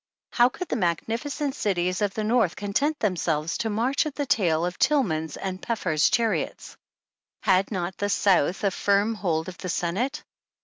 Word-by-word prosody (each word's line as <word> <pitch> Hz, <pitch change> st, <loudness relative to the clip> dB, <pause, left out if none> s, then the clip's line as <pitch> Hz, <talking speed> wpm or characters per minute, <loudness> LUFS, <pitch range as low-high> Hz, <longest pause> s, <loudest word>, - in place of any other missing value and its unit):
Could 255 Hz, +9 st, +2 dB
the -, -, 0 dB
magnificent 235 Hz, -, -1 dB
cities 185 Hz, -5 st, -1 dB
of 205 Hz, -2 st, 0 dB
the 215 Hz, -, -1 dB
North 220 Hz, -5 st, +2 dB
content 280 Hz, +10 st, 0 dB
themselves 165 Hz, -5 st, -1 dB
to 225 Hz, -, -1 dB
march 250 Hz, +9 st, +1 dB
at 295 Hz, -, -6 dB
the 290 Hz, -, -2 dB
tail 170 Hz, -9 st, +2 dB
of 180 Hz, 0 st, -4 dB
Tillman's 160 Hz, -, +1 dB
and 190 Hz, -1 st, -5 dB
Peffer's 170 Hz, -10 st, +1 dB
chariots? 225 Hz, -2 st, -1 dB, 0.7 s
Had 190 Hz, -1 st, +3 dB
not 185 Hz, -2 st, -3 dB
the 205 Hz, -, -1 dB
South 195 Hz, -2 st, +2 dB
a 200 Hz, -, +2 dB
firm 200 Hz, +4 st, +2 dB
hold 165 Hz, -7 st, -1 dB
of 185 Hz, -2 st, -8 dB
the 185 Hz, -, -5 dB
Senate 200 Hz, -, -1 dB
200 Hz, 165 wpm, -25 LUFS, 175-235 Hz, 0.7 s, Had